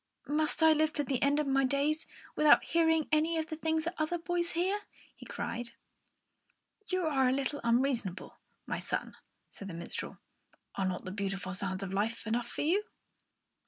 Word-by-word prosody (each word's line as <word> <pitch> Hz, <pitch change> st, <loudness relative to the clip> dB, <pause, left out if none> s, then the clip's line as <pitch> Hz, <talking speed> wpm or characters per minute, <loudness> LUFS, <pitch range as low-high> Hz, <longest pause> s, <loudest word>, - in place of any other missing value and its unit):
"Must 305 Hz, +2 st, +1 dB
I 320 Hz, 0 st, +8 dB
live 310 Hz, 0 st, +2 dB
to 290 Hz, -, 0 dB
the 265 Hz, -2 st, -1 dB
end 285 Hz, +1 st, +3 dB
of 300 Hz, -, +1 dB
my 270 Hz, 0 st, +2 dB
days 280 Hz, +4 st, +1 dB, 0.3 s
without 305 Hz, -1 st, +6 dB
hearing 320 Hz, -2 st, +2 dB
any 315 Hz, +2 st, +2 dB
of 320 Hz, 0 st, -2 dB
the 315 Hz, -, -3 dB
things 320 Hz, 0 st, 0 dB
that 340 Hz, +2 st, -2 dB
other 310 Hz, +3 st, 0 dB
boys 345 Hz, 0 st, -1 dB
hear?" 370 Hz, +4 st, +1 dB, 0.4 s
he -, -, -12 dB
cried. 235 Hz, 0 st, -4 dB, 1.1 s
"You 370 Hz, -1 st, 0 dB
are 270 Hz, -5 st, +3 dB
a -, -, +2 dB
little 275 Hz, +2 st, -1 dB
unreasonable, 235 Hz, -5 st, 0 dB, 0.3 s
my -, -, -3 dB
son," -, -, -3 dB, 0.4 s
said 200 Hz, -, -8 dB
the 180 Hz, -, -6 dB
minstrel. 170 Hz, +1 st, -5 dB, 0.6 s
"Are 195 Hz, -1 st, -1 dB
not 185 Hz, -1 st, -3 dB
the 185 Hz, -, -4 dB
beautiful 195 Hz, -1 st, -3 dB
sounds 190 Hz, 0 st, -2 dB
of 195 Hz, 0 st, -5 dB
life 220 Hz, +4 st, -1 dB
enough 235 Hz, +2 st, -1 dB
for -, -, -5 dB
you?" 380 Hz, +8 st, +2 dB
285 Hz, 180 wpm, -32 LUFS, 230-320 Hz, 1.1 s, I